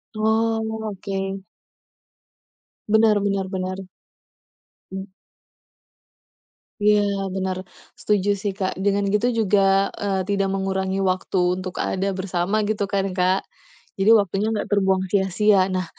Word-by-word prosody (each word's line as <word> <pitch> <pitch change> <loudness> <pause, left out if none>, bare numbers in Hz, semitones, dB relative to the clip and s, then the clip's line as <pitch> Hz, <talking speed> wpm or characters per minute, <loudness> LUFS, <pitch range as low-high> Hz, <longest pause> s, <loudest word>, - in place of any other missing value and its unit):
Oh, 220 0 0
oke. 195 0 -4 1.5
Benar 220 -1 +4
benar 195 -1 0
benar. 185 0 -4 1.1
Mmm. 190 +1 -7 1.7
Ya, 210 0 +4 0.3
benar. 190 -1 -2 0.4
Setuju 205 -1 +1
sih, 200 -1 -1
Kak. 190 -2 -1
Dengan 200 0 +2
gitu 210 +3 +2
juga, 195 -3 +2
eee, 195 -2 -2
tidak 195 -1 +1
mengurangi 190 0 -1
waktu 185 0 -1 0.2
untuk 185 -1 -7
ada 195 +1 -1
bersama, 190 +3 -1
gitu 205 -2 -1
kan, 195 -1 0
Kak? 185 +1 +1 0.6
Jadi 205 - +4
waktunya 200 +1 0
nggak 215 -2 -2
terbuang 190 -2 +2
sia-sia. 195 0 +3
Nah, 185 -1 -1
195 Hz, 115 wpm, -22 LUFS, 190-210 Hz, 1.7 s, Benar